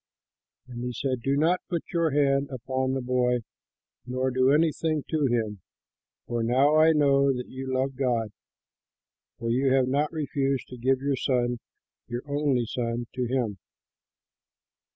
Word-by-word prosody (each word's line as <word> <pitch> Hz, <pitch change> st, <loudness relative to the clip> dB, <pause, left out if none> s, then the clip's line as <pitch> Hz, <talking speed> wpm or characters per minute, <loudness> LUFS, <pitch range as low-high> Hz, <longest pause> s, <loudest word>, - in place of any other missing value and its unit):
And 120 Hz, -1 st, -7 dB
he 125 Hz, 0 st, -3 dB
said, 130 Hz, +1 st, -2 dB
"Do 135 Hz, +3 st, +1 dB
not 170 Hz, +5 st, +2 dB
put 170 Hz, -3 st, -2 dB
your 170 Hz, -1 st, +2 dB
hand 140 Hz, -1 st, +2 dB
upon 130 Hz, 0 st, -2 dB
the 135 Hz, -, -2 dB
boy, 125 Hz, -1 st, +1 dB, 0.7 s
nor 130 Hz, +1 st, -1 dB
do 130 Hz, +1 st, +3 dB
anything 155 Hz, 0 st, +1 dB
to 155 Hz, -3 st, +2 dB
him, 110 Hz, -5 st, -1 dB, 0.6 s
for 120 Hz, -1 st, -2 dB
now 130 Hz, +6 st, +3 dB
I 155 Hz, +1 st, +6 dB
know 140 Hz, -2 st, +4 dB
that 125 Hz, -1 st, -4 dB
you 130 Hz, 0 st, -6 dB
love 130 Hz, +1 st, 0 dB
God, 120 Hz, -5 st, 0 dB, 1.1 s
for 115 Hz, 0 st, -2 dB
you 130 Hz, +2 st, +2 dB
have 130 Hz, -1 st, +3 dB
not 145 Hz, +3 st, +1 dB
refused 140 Hz, -4 st, -1 dB
to 125 Hz, -, -9 dB
give 130 Hz, +2 st, +1 dB
your 140 Hz, 0 st, 0 dB
son, 125 Hz, -2 st, 0 dB, 0.5 s
your 120 Hz, +1 st, -4 dB
only 140 Hz, -4 st, +1 dB
son, 120 Hz, +1 st, -3 dB
to 125 Hz, -1 st, -2 dB
him." 115 Hz, -6 st, -1 dB
130 Hz, 150 wpm, -27 LUFS, 125-140 Hz, 1.1 s, I